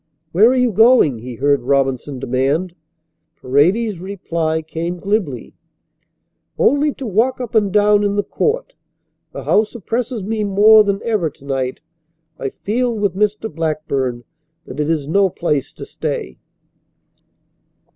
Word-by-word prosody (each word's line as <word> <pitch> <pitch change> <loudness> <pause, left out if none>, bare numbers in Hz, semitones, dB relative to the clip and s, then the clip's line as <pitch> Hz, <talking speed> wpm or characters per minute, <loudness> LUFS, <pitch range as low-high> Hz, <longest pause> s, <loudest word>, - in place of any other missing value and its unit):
"Where 210 +7 +5
are 260 - +2
you 250 -2 +2
going?" 220 - +4
he 120 +1 -8
heard 140 +1 +1
Robinson 135 +1 0
demand. 135 +7 -1 0.7
Paredes's 180 - +1
reply 170 -4 -3
came 165 +3 -4
glibly. 180 - -2 1.0
"Only 285 +3 +3
to 270 - -7
walk 230 +5 +1
up 245 -3 -6
and 210 -3 +2
down 205 0 +4
in 200 0 0
the 205 - +1
court. - - -2 0.6
The - - -7
house 215 +1 +1
oppresses 230 +1 -3
me 215 +2 -2
more 210 +2 +6
than 200 -1 -1
ever 210 -8 0
to 145 -1 -20
night. 130 -2 -3 0.6
I 135 - -2
feel 240 - -2
with 205 -4 0
Mr. 210 +2 0
Blackburn 145 -6 -2 0.4
that - - -9
it 150 +1 0
is 155 -4 -1
no 195 +4 +3
place 150 -5 -2
to - - -9
stay." 65 - -5
190 Hz, 140 wpm, -18 LUFS, 145-215 Hz, 1.0 s, more